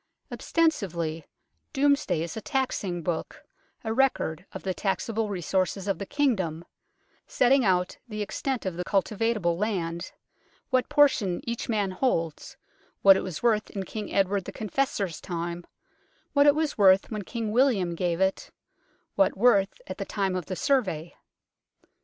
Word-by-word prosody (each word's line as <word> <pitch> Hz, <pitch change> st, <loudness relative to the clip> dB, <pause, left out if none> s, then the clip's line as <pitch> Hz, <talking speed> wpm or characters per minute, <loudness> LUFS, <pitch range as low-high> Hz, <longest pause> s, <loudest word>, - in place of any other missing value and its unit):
Ostensibly 170 Hz, -, -1 dB, 0.5 s
Domesday 280 Hz, -, +2 dB
is 170 Hz, -, -6 dB
a 220 Hz, -, -5 dB
taxing 205 Hz, -, -2 dB
book, 165 Hz, -2 st, -4 dB, 0.4 s
a 220 Hz, -1 st, -2 dB
record 210 Hz, -, 0 dB
of -, -, -8 dB
the 190 Hz, -, -1 dB
taxable 215 Hz, +3 st, -1 dB
resources 190 Hz, +1 st, -1 dB
of 195 Hz, -, -1 dB
the 200 Hz, -, -5 dB
Kingdom, 190 Hz, -, 0 dB, 0.6 s
setting 260 Hz, +2 st, +3 dB
out 180 Hz, -3 st, +1 dB
the 215 Hz, -2 st, -3 dB
extent 255 Hz, +4 st, -3 dB
of 185 Hz, -3 st, -3 dB
the 180 Hz, -, -2 dB
cultivable 200 Hz, -2 st, 0 dB
land, 175 Hz, -5 st, -2 dB, 0.6 s
what 255 Hz, -1 st, +2 dB
portion 275 Hz, -, +3 dB
each 235 Hz, 0 st, -3 dB
man 205 Hz, -4 st, 0 dB
holds, 170 Hz, -, -2 dB, 0.5 s
what 195 Hz, -1 st, +9 dB
it -, -, 0 dB
was 180 Hz, +1 st, -6 dB
worth 220 Hz, -3 st, +2 dB
in 195 Hz, -, -4 dB
King 210 Hz, +2 st, -6 dB
Edward 195 Hz, -1 st, +1 dB
the -, -, -6 dB
Confessor's 210 Hz, -, -2 dB
time, 170 Hz, -1 st, -5 dB, 0.7 s
what 285 Hz, 0 st, +5 dB
it 290 Hz, -, +6 dB
was 305 Hz, -5 st, -1 dB
worth 195 Hz, +1 st, +5 dB
when 215 Hz, -1 st, -3 dB
King 220 Hz, +2 st, -4 dB
William 220 Hz, -8 st, +2 dB
gave 170 Hz, 0 st, -1 dB
it, 190 Hz, 0 st, 0 dB, 0.6 s
what 195 Hz, -1 st, +2 dB
worth 205 Hz, -, +3 dB
at -, -, -7 dB
the -, -, -1 dB
time 195 Hz, -3 st, -1 dB
of 180 Hz, -5 st, -4 dB
the 185 Hz, -, -3 dB
Survey. 185 Hz, -, 0 dB
195 Hz, 150 wpm, -27 LUFS, 180-235 Hz, 0.7 s, what